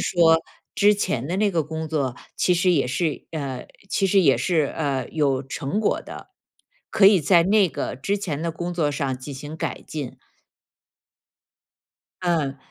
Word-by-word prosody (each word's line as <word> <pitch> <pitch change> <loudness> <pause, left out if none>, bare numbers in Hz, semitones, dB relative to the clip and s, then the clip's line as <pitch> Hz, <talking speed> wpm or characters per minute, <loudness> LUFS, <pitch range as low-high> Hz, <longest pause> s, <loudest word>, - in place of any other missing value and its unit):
说 165 -2 +4 0.3
之 205 +1 +5
前 135 - -2
的 175 +5 -2
那 205 0 +2
个 165 -4 +1
工 160 +1 -5
作 140 -5 -1 0.2
其 180 - +2
实 180 +1 +2
也 145 -7 +2
是 150 +4 -2
呃， 135 -5 -4 0.2
其 195 - +1
实 195 +1 +4
也 140 -7 +4
是， 165 -5 +1
呃， 140 -5 -1
有 140 -4 +1
成 140 +8 -3
果 215 - +1
的， - - -10 0.6
可 195 -3 +5
以 195 -3 +6
在 170 +3 +5
那 200 +1 +4
个 130 - -4
之 200 +10 -1
前 155 -7 -3
的 170 - -1
工 175 +2 -5
作 150 -4 +1
上 135 -3 -2
进 135 +2 -8
行 145 +4 -8
改 - - -4
进？” 145 -5 -6 2.0
嗯。 155 -6 0
160 Hz, 180 characters per minute, -23 LUFS, 140-180 Hz, 2.0 s, 以